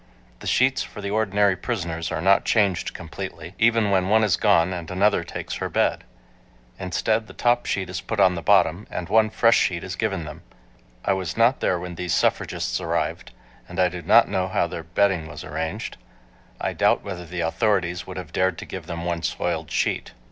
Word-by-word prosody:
The - - -8
sheets 130 +1 +3
for - - -7
the 100 -1 -4
ordinary 105 -2 +2
prisoners 85 -6 -3
are 80 - -2
not 95 +1 +5
changed 100 -5 +1
completely, 85 0 -7
even 115 -2 +3
when 95 -1 +2
one 110 +1 +4
is 100 -4 +3
gone 95 -4 +3
and 85 -2 -6
another 100 +3 +2
takes - - -6
her - - -3
bed. - - 0 0.7
Instead 110 +4 0
the - - -12
top 120 0 +1
sheet 95 -2 -1
is 90 +1 -5
put 110 - -4
on 95 -2 +5
the 85 - -4
bottom, 100 0 +3
and 90 0 -5
one 110 +1 +4
fresh 115 +1 +4
sheet 85 -2 0
is - - -5
given 85 - -2
them. 75 0 -9 0.6
I 100 - +3
was 95 -1 -3
not 115 +3 +4
there 90 - +1
when 90 0 -6
these 85 0 -1
suffragists - - 0
arrived, - - -2 0.4
and - - -6
I 90 -1 +4
do 90 0 -7
not - - +5
know 95 -1 -1
how 95 - +1
their 85 -1 -5
bedding 90 0 +1
was 85 - -8
arranged. 80 -2 -4 0.6
I - - -2
doubt - - +2
whether 90 -3 -6
the 90 +1 -4
authorities 90 0 0
would 95 - -7
have 85 -3 -8
dared 95 -2 +1
to - - -7
give - - -8
them 85 0 -5
one 85 -1 -2
soiled 80 -2 -2
sheet. - - -1
90 Hz, 200 wpm, -24 LUFS, 85-105 Hz, 0.7 s, not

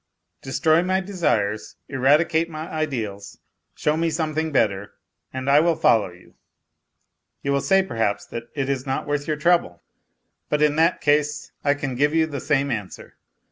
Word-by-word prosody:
Destroy 155 +5 +2
my 185 +1 +1
desires, 135 - -1
eradicate 150 +5 +2
my 155 0 -6
ideals, 115 -12 -4 0.4
show 150 - 0
me 165 +1 0
something 160 0 -2
better, 100 -7 0 0.4
and 130 0 -5
I 140 +1 +6
will 165 +1 +3
follow 110 -9 +3
you. 90 0 -18 1.1
You 140 - 0
will 140 0 +1
say, 195 +4 +3
perhaps, 110 - -1
that 115 0 -8
it 135 -2 -1
is 135 -1 -2
not 135 - -2
worth 145 0 -2
your 155 -1 -1
trouble; 155 - +1 0.7
but 150 0 +1
in 150 -1 +3
that 165 +2 +2
case 150 0 +1
I 145 0 +3
can 135 -2 -4
give 145 +5 +1
you 160 -1 +4
the 145 -3 -5
same 140 -2 +1
answer. 105 -5 -6
145 Hz, 165 wpm, -23 LUFS, 130-160 Hz, 1.1 s, I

